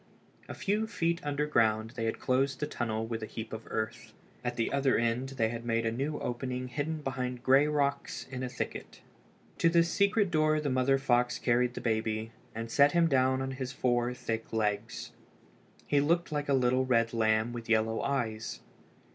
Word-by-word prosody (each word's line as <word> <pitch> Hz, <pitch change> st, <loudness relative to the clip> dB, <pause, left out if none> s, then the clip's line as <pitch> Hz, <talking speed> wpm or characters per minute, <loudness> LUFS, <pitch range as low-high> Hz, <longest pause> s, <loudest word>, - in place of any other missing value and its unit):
A -, -, -5 dB
few 210 Hz, +3 st, 0 dB
feet 170 Hz, -6 st, -1 dB
underground 115 Hz, -7 st, +1 dB
they 115 Hz, -2 st, -3 dB
had 115 Hz, -, -1 dB
closed 135 Hz, +1 st, +1 dB
the 150 Hz, -, 0 dB
tunnel 110 Hz, -6 st, -2 dB
with 115 Hz, 0 st, -4 dB
a 110 Hz, -, -4 dB
heap 110 Hz, 0 st, -7 dB
of 110 Hz, 0 st, -7 dB
earth. 110 Hz, 0 st, -4 dB, 0.3 s
At 120 Hz, 0 st, -2 dB
the 115 Hz, -, -1 dB
other 140 Hz, -1 st, +3 dB
end 120 Hz, +3 st, 0 dB
they 110 Hz, -3 st, +2 dB
had 115 Hz, 0 st, -5 dB
made 115 Hz, -1 st, 0 dB
a 115 Hz, -, +1 dB
new 140 Hz, +6 st, -2 dB
opening 125 Hz, +1 st, -3 dB
hidden 150 Hz, +3 st, -3 dB
behind 125 Hz, -2 st, -3 dB
gray 135 Hz, +3 st, +5 dB
rocks 145 Hz, -2 st, -1 dB
in 130 Hz, -1 st, -4 dB
a 130 Hz, -, -2 dB
thicket. -, -, -6 dB, 0.6 s
To 165 Hz, -, +5 dB
this 170 Hz, 0 st, +3 dB
secret 200 Hz, -1 st, +2 dB
door 155 Hz, -1 st, +3 dB
the 145 Hz, -2 st, -1 dB
mother 130 Hz, +1 st, +3 dB
fox 125 Hz, -2 st, +2 dB
carried 125 Hz, 0 st, +1 dB
the -, -, -5 dB
baby, 110 Hz, -1 st, -1 dB, 0.2 s
and 115 Hz, 0 st, -5 dB
set 140 Hz, +2 st, +5 dB
him 170 Hz, -1 st, +4 dB
down 130 Hz, -2 st, +2 dB
on 135 Hz, -, -3 dB
his 130 Hz, -1 st, -4 dB
four 120 Hz, -1 st, +1 dB
thick 115 Hz, -2 st, -4 dB
legs. 105 Hz, 0 st, -2 dB, 0.7 s
He 145 Hz, -1 st, +3 dB
looked 170 Hz, +3 st, +1 dB
like 145 Hz, -1 st, -2 dB
a 140 Hz, -, +4 dB
little 130 Hz, 0 st, +3 dB
red 115 Hz, -3 st, +2 dB
lamb 110 Hz, +1 st, +2 dB
with 115 Hz, -2 st, -7 dB
yellow 110 Hz, 0 st, +2 dB
eyes. 115 Hz, -5 st, -2 dB
125 Hz, 190 wpm, -30 LUFS, 115-140 Hz, 0.7 s, gray